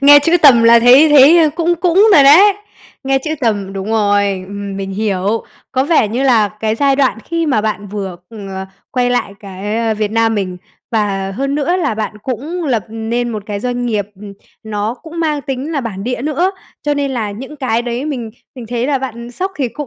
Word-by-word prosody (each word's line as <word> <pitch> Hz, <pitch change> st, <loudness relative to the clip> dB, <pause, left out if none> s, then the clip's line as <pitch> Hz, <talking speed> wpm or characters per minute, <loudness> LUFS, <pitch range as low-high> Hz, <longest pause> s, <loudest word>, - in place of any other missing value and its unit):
Nghe 290 Hz, +1 st, +8 dB
chữ 330 Hz, +4 st, +2 dB
tầm 255 Hz, -6 st, +7 dB
là 230 Hz, 0 st, +6 dB
thấy 255 Hz, +6 st, +7 dB
thấy, 295 Hz, +3 st, +7 dB
ơ, 315 Hz, -2 st, +4 dB
cũng 340 Hz, +1 st, +1 dB
cũng 360 Hz, +5 st, +3 dB
rồi 285 Hz, -, +7 dB
đấy. 340 Hz, +10 st, +7 dB, 0.5 s
Nghe 270 Hz, 0 st, +2 dB
chữ 310 Hz, +4 st, -4 dB
tầm 205 Hz, -6 st, -1 dB
đúng 195 Hz, +2 st, -5 dB
rồi, 205 Hz, -3 st, +1 dB
ừm 200 Hz, -1 st, -6 dB
mình 195 Hz, 0 st, -5 dB
hiểu. 205 Hz, +1 st, -1 dB, 0.3 s
Có 260 Hz, 0 st, +1 dB
vẻ 295 Hz, -8 st, +2 dB
như 240 Hz, +5 st, -2 dB
là 230 Hz, -6 st, +3 dB
cái 220 Hz, 0 st, 0 dB
giai 275 Hz, +3 st, +2 dB
đoạn 265 Hz, -5 st, +1 dB
khi 335 Hz, -1 st, -2 dB
mà 265 Hz, -8 st, +1 dB
bạn 210 Hz, -1 st, -3 dB
vừa, 195 Hz, -3 st, -5 dB
ừm, 210 Hz, -3 st, -9 dB
ờ, 190 Hz, 0 st, -6 dB, 0.2 s
quay 245 Hz, -1 st, 0 dB
lại 245 Hz, -5 st, -1 dB
cái, 200 Hz, +2 st, -5 dB
a, 225 Hz, -1 st, 0 dB
Việt 210 Hz, -1 st, -2 dB
Nam 225 Hz, 0 st, +1 dB
mình, 185 Hz, -3 st, -3 dB, 0.3 s
và 200 Hz, -4 st, -1 dB
hơn 275 Hz, +2 st, -2 dB
nữa 300 Hz, +5 st, 0 dB
là 325 Hz, -11 st, -1 dB
bạn 215 Hz, 0 st, -4 dB
cũng 290 Hz, +9 st, -4 dB
lập 235 Hz, -9 st, -1 dB
nên 225 Hz, +2 st, -3 dB
một 215 Hz, -2 st, -5 dB
cái 205 Hz, -1 st, -4 dB
doanh 245 Hz, +1 st, -2 dB
nghiệp, 210 Hz, -4 st, -1 dB
ừm, 205 Hz, -1 st, -9 dB, 0.3 s
nó 215 Hz, +1 st, -3 dB
cũng 335 Hz, +1 st, -7 dB
mang 305 Hz, -3 st, -1 dB
tính 270 Hz, +3 st, -4 dB
là 290 Hz, -, -1 dB
bản 205 Hz, -5 st, -6 dB
địa 250 Hz, 0 st, -3 dB
nữa, 310 Hz, +6 st, 0 dB, 0.3 s
cho 295 Hz, 0 st, 0 dB
nên 285 Hz, -1 st, -1 dB
là 225 Hz, -5 st, -3 dB
những 265 Hz, +8 st, -9 dB
cái 240 Hz, -4 st, -1 dB
đấy 240 Hz, +2 st, -4 dB
mình 255 Hz, -7 st, -4 dB, 0.2 s
mình 245 Hz, -3 st, -9 dB
thấy 240 Hz, +1 st, -2 dB
là 280 Hz, -1 st, 0 dB
bạn, 260 Hz, -3 st, -5 dB
ừ, 240 Hz, -, -9 dB
sốc 375 Hz, +10 st, -4 dB
thì 270 Hz, -4 st, -1 dB
cũng 295 Hz, +5 st, -7 dB
240 Hz, 225 wpm, -15 LUFS, 210-285 Hz, 0.5 s, Nghe